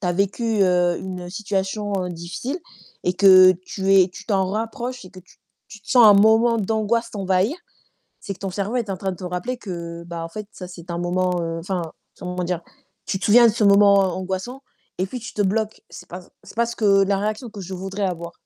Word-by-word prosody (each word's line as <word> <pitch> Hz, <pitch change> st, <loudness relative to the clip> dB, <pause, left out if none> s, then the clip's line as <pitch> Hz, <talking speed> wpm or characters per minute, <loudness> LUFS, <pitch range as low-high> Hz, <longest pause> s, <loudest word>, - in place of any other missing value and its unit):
tu 185 Hz, -, -3 dB
as -, -, +1 dB
vécu, 200 Hz, +5 st, -1 dB, 0.2 s
heu, 180 Hz, -1 st, +2 dB
une 180 Hz, -2 st, -7 dB
situation, 205 Hz, +1 st, -3 dB
heu, 180 Hz, -, -4 dB
difficile 175 Hz, -, -5 dB, 0.5 s
et 180 Hz, -, +2 dB
que 185 Hz, -1 st, +8 dB
tu 195 Hz, 0 st, 0 dB
es 190 Hz, -1 st, +6 dB
tu 180 Hz, -, -12 dB
t'en 195 Hz, -3 st, +1 dB
rapproches 235 Hz, +3 st, -4 dB
et 185 Hz, -, -12 dB
que 185 Hz, -, -13 dB
tu 180 Hz, -, -23 dB, 0.3 s
tu 215 Hz, -, -12 dB
te -, -, -21 dB
sens 245 Hz, -3 st, +7 dB
un 205 Hz, -, +8 dB
moment 220 Hz, +3 st, +5 dB
d'angoisse 225 Hz, +3 st, -1 dB
t'envahir. 195 Hz, -, 0 dB, 0.6 s
C'est 195 Hz, -, -6 dB
que -, -, -22 dB
ton 195 Hz, -, -3 dB
cerveau 200 Hz, +6 st, -3 dB
est 225 Hz, -5 st, -2 dB
en 190 Hz, -, -2 dB
train 190 Hz, -1 st, -2 dB
de -, -, -8 dB
te 185 Hz, -, -9 dB
rappeler 180 Hz, +8 st, -3 dB
que 170 Hz, -6 st, -7 dB
bah, 170 Hz, -1 st, -6 dB
en -, -, -6 dB
fait, 210 Hz, +5 st, -7 dB
ça, 180 Hz, -, -9 dB
c'est 175 Hz, -1 st, -11 dB
un 170 Hz, -, -3 dB
moment, 180 Hz, 0 st, 0 dB
heu 165 Hz, 0 st, -3 dB
enfin, 180 Hz, +1 st, -3 dB, 0.4 s
comment 180 Hz, 0 st, -4 dB
dire? 175 Hz, -1 st, -2 dB, 0.5 s
Tu 190 Hz, -, -2 dB
te -, -, -6 dB
souviens 235 Hz, +3 st, +7 dB
de 225 Hz, -, +4 dB
ce 220 Hz, -1 st, 0 dB
moment 200 Hz, 0 st, +6 dB
angoissant 190 Hz, +7 st, -3 dB, 0.4 s
et 185 Hz, -, 0 dB
puis 250 Hz, -, -6 dB
tu 235 Hz, -, -8 dB
te 210 Hz, -, -3 dB
bloques. 215 Hz, +2 st, -1 dB
C'est 180 Hz, -, -11 dB
pas 180 Hz, +2 st, -7 dB
c -, -, -20 dB
c'est -, -, -15 dB
pas 235 Hz, 0 st, +2 dB
ce 235 Hz, -, -6 dB
que 200 Hz, -2 st, +4 dB
la 195 Hz, 0 st, +1 dB
réaction 215 Hz, +4 st, -3 dB
que 210 Hz, -2 st, -10 dB
je 185 Hz, +2 st, -8 dB
voudrais 195 Hz, +2 st, -5 dB
avoir, 170 Hz, -2 st, -4 dB
195 Hz, 235 wpm, -22 LUFS, 180-215 Hz, 0.6 s, que